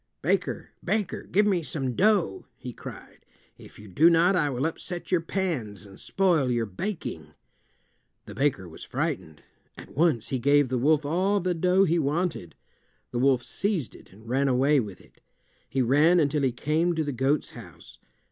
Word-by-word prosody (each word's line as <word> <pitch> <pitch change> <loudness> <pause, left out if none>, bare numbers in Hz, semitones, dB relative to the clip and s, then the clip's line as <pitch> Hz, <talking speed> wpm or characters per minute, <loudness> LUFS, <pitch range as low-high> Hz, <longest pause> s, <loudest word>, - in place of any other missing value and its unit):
"Baker, - - -1
baker, 210 -5 -2
give 205 +3 +4
me 190 -4 +2
some 135 -5 -3
dough," 200 - +1
he - - -8
cried. - - -11 0.4
"If - - -14
you 105 - -12
do 150 - +4
not 175 +3 +4
I 150 -5 +2
will 130 +1 -2
upset 175 +2 -5
your 180 -2 +3
pans 145 - -3
and 95 -1 -14
spoil 175 -9 +1
your 120 -2 0
baking." 110 - -6 0.9
The - - -9
baker 130 -10 0
was 80 - -11
frightened. 80 -1 -4 0.3
At - - -12
once 150 -7 +2
he 130 - -1
gave 140 +1 +3
the 125 -1 -1
wolf 150 +3 +2
all 185 +7 +1
the 180 -1 -1
dough 180 +3 +3
he 170 -2 +2
wanted. 155 - -2 0.6
The 120 - -2
wolf 130 -2 +3
seized 195 - -2
it - - -16
and 110 +4 -17
ran 135 +3 +1
away 135 +3 +3
with 105 -6 -5
it. - - -24 0.5
He 130 0 0
ran 150 +8 +4
until 150 -1 +1
he 135 -2 +2
came 155 +7 0
to 160 - 0
the 145 - -3
goat's 135 +3 0
house. - - -13
145 Hz, 175 wpm, -26 LUFS, 125-175 Hz, 0.9 s, give